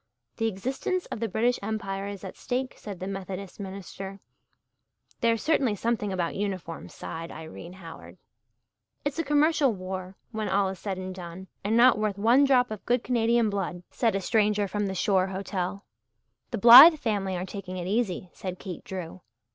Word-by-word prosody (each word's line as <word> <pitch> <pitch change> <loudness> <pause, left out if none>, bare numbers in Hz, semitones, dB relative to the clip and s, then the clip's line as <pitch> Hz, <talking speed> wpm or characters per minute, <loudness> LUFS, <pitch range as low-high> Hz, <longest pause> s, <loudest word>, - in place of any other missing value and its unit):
"The 225 - +1
existence 260 - -2
of - - -4
the 230 0 -2
British 240 +5 +1
Empire 200 -2 -3
is 200 -1 -7
at 190 - -7
stake," 255 +1 -3
said 200 -4 -8
the 185 - -4
Methodist 195 0 -6
minister. 195 0 -7 1.0
"There's 230 -1 +1
certainly 270 -9 +2
something 215 -1 -1
about 175 -3 -1
uniforms," 190 -5 -5
sighed 165 +1 -6
Irene 160 +2 -9
Howard. 170 -3 -11 0.9
"It's 290 +2 -2
a - - +1
commercial 295 -1 +3
war 185 0 -6
when 215 -2 -3
all 195 0 +2
is 190 -2 -7
said 195 -3 -4
and 185 0 -5
done 180 +1 -9
and 215 +3 +1
not 245 -2 +6
worth 210 -2 -1
one 235 +7 +5
drop 250 -3 +3
of 215 - -6
good 245 0 +2
Canadian 235 -2 +2
blood," 180 -3 -3
said 230 -4 +1
a 195 - 0
stranger 210 -1 +2
from 205 +1 -2
the 190 - -3
shore 185 0 +2
hotel. 190 0 -4 0.6
"The 235 - -3
Blythe 250 - +11
family 200 -7 -1
are 180 - -3
taking 190 -1 -7
it 175 - -4
easy," 190 -3 -1
said 185 -1 -6
Kate 180 -2 -7
Drew. 185 -1 -7
200 Hz, 175 wpm, -27 LUFS, 185-230 Hz, 1.0 s, Blythe